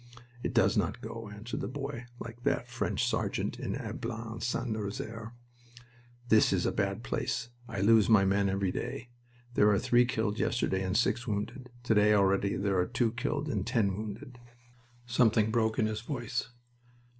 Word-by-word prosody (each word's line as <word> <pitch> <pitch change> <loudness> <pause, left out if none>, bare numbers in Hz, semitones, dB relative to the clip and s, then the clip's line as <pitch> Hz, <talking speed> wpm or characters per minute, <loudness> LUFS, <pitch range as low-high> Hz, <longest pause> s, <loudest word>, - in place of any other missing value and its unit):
"It - - -3
does - - +4
not - - 0
go," 115 -2 -7
answered 105 +4 -5
the - - -2
boy 135 -2 -5
like 115 +1 -8
that - - 0
French - - -1
sergeant - - -1
in - - -3
Ablain 115 -1 -5
St. 120 +1 -1
Nazaire. 110 +2 -4 0.9
"This 110 -1 +5
is - - +1
a - - +2
bad - - -1
place. 115 - -2 0.2
I 95 - -3
lose 110 +1 +5
my 105 -3 +6
men 100 +1 +2
every 95 -1 0
day. 120 +5 -5 0.4
There 105 - +4
were 105 -1 +5
three 120 +2 +4
killed 110 -3 -1
yesterday, 95 -6 0
and 95 -1 0
six 120 +1 +1
wounded. 115 +5 -3
To 125 - +2
day 105 0 +5
already 100 0 +2
there 100 -1 +1
are 90 - +1
two 120 -2 +1
killed 145 +5 -2
and 145 - -1
ten 115 -6 +1
wounded." 110 +4 -7 0.7
Something 115 -2 +3
broke 110 -1 +1
in 110 - +3
his 110 0 -2
voice. 125 0 -3
110 Hz, 170 wpm, -30 LUFS, 105-120 Hz, 0.9 s, my